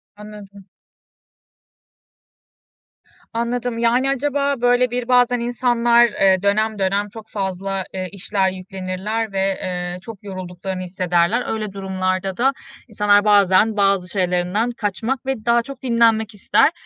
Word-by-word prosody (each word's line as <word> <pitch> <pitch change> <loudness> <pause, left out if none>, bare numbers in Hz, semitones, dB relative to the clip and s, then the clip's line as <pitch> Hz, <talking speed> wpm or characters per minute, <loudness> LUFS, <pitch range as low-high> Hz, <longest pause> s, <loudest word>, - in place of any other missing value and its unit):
Anladım. 205 -2 -12 2.7
Anladım. 235 +1 -2
Yani, 240 +3 +2
acaba, 280 -1 -1
böyle, 245 0 +3
bir, 245 0 -3
bazen 245 -1 +3
insanlar, 240 0 +3
eee, 190 -3 +2
dönem 215 +1 +1
dönem 200 +2 0
çok 220 +1 -12
fazla, 195 -1 -3
eee, 185 -1 -4
işler 195 -1 -1
yüklenirler 190 +4 -4
ve, 195 - -2 0.2
eee, 180 -1 -4
çok 220 -3 -11
yorulduklarını 185 -1 -6
hissederler. 180 +4 0
Öyle 215 -3 -4
durumlarda 190 -1 -2
da 265 +3 +2 0.3
insanlar 205 -1 +3
bazen 205 +1 +4
bazı 195 -2 +2
şeylerinden 185 +4 0
kaçmak 235 +5 -3
ve 265 -5 -3
daha 235 0 +4
çok 270 +2 -10
dinlenmek 230 -3 +2
ister. 210 +9 +3
210 Hz, 120 wpm, -20 LUFS, 190-235 Hz, 2.7 s, bazen